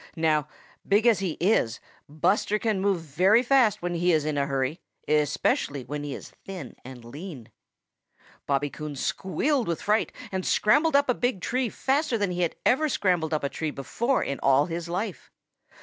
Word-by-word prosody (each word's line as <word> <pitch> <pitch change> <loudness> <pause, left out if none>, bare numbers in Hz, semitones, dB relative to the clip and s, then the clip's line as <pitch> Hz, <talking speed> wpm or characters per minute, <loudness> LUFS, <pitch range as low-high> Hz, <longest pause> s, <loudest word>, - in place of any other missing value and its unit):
Now 155 -2 +2 0.4
big 205 +3 +3
as 230 -4 +5
he 190 -4 -1
is, 165 - +1 0.3
Buster 185 +7 +1
can 215 -3 -1
move 195 -3 +1
very 185 - +3
fast 250 -7 +3
when 175 0 -1
he 175 +1 +2
is 155 -3 +2
in 155 -1 -1
a 140 -1 0
hurry, 135 +3 -2 0.3
especially 145 -2 +1
when 145 +3 -5
he 145 -2 -4
is - - -10
thin 180 -10 -8
and 125 -2 -11
lean. 145 - -9 1.0
Bobby 140 0 0
Coon 150 -1 -6
squealed 220 - -1
with 170 -1 -2
fright 210 +2 +1 0.2
and 190 -1 -2
scrambled 295 - +3
up 285 0 +4
a 250 - +3
big 245 -4 -1
tree 250 +6 -1
faster 270 +2 0
than 205 -3 0
he 175 -1 0 0.2
ever 270 +5 +3
had 300 - -1
scrambled 175 -7 +1
up 155 -2 -1
a 140 - 0
tree 160 +2 -3
before 235 - -1
in 140 - -3
all 135 +1 +4
his 170 0 -5
life. 185 +1 -4
175 Hz, 180 wpm, -26 LUFS, 150-215 Hz, 1.0 s, as